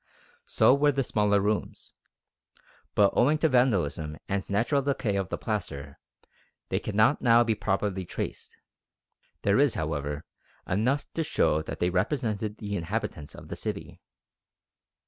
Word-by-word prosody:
So 475 - +5
were 145 +1 +4
the 135 -1 0
smaller 105 -3 +2
rooms. 105 +1 -2 1.0
But 100 -1 +4
owing 145 +5 +4
to 160 - +3
vandalism 90 - +1
and 100 -1 -2
natural 115 +8 +1
decay 135 -7 -1
of 95 -2 -1
the - - -3
plaster, 75 -10 -4 0.7
they - - 0
cannot 110 +6 +2
now 120 -1 +6
be 115 -1 +1
properly 100 -2 -1
traced. 85 - -6 0.9
There 100 +3 +3
is, 145 -3 +3
however, 75 -1 -3 0.4
enough 125 +9 +1
to 165 - -1
show 80 - +2
that 80 - -7
they 90 +1 +1
represented 105 - -1
the 100 -1 -4
inhabitants 85 -5 -4
of - - -12
the - - -4
city. - - -6
105 Hz, 140 wpm, -27 LUFS, 90-125 Hz, 1.0 s, now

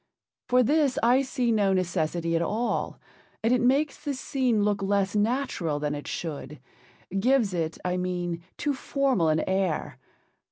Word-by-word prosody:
For 250 0 +5
this 285 0 +2
I 245 +3 +5
see 255 -3 -1
no 205 -3 +3
necessity 170 -2 0
at 165 - +1
all, 220 +7 -1 0.4
and 230 +2 +3
it 250 - +2
makes 275 +4 +1
the 285 -2 -2
scene 255 -5 0
look 205 -1 +1
less 195 0 0
natural 210 - 0
than 150 0 -1
it 145 0 -6
should—gives 180 - -3
it, 165 -2 -2
I 180 0 0
mean, 175 -2 -2 0.2
too 290 - 0
formal 265 - +1
an 155 0 +2
air. 190 -4 -1
200 Hz, 150 wpm, -27 LUFS, 170-250 Hz, 0.4 s, For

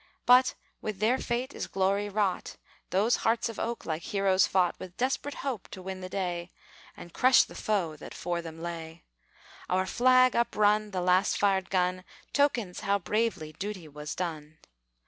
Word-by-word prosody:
But 250 +1 +6 0.3
with 215 -2 -4
their 225 +6 +2
fate 250 +3 -2
is - - -4
glory 195 +2 0
wrought, 200 -3 -1 0.3
Those 205 +6 +2
hearts 230 +1 +1
of 225 - -7
oak 235 0 -3
like 160 0 -2
heroes 195 -1 +2
fought 180 -2 +2
With 180 -1 -9
desperate 270 +3 -1
hope 250 -8 -3
to 190 - -9
win 190 0 -6
the 185 - -6
day, 180 -2 -3 0.5
And 175 - -11
crush 255 +1 +6
the - - -12
foe 185 -7 -1
that - - -10
'fore 175 0 -2
them 165 0 -9
lay. 165 -1 -6 0.7
Our 185 +1 +2
flag 255 +4 +4
up 235 0 +1
run, 210 0 +3
the 185 -3 -2
last 180 +2 +3
fired 195 -2 +1
gun, 185 -1 0 0.3
Tokens 240 -10 +1
how 200 0 +1
bravely 200 -5 -1
duty 195 -2 -6
was 150 0 -7
done. 155 -3 -5
190 Hz, 170 wpm, -29 LUFS, 175-225 Hz, 0.7 s, But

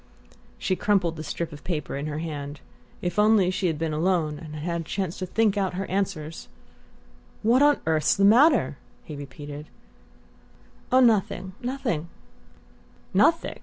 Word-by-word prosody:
She 185 - 0
crumpled 180 -3 +1
the 155 - -6
strip 165 +1 -4
of 145 - -11
paper 160 -6 -3
in 140 +2 -3
her 150 0 -4
hand. 145 -3 -5 0.4
If 175 +1 -1
only 210 -3 +4
she 185 0 -1
had 160 -3 -1
been 160 0 -2
alone, 155 -2 0
had 155 -2 -9
had 170 +2 -3
a - - -6
chance 185 +1 -3
to 185 - -3
think 215 +1 +1
out 190 -2 0
her 195 +1 -2
answers! 180 -5 -3 1.0
"What 240 +5 +4
on 290 0 +5
earth's 155 -1 +2
the 200 - +3
matter?" 235 - +5 0.3
he 150 - -8
repeated. 145 +1 -8 1.2
"Oh, 255 +1 +6
nothing 195 -5 +2
nothing." 245 - -2 1.0
"Nothing? 335 0 +2
175 Hz, 155 wpm, -25 LUFS, 155-205 Hz, 1.2 s, Oh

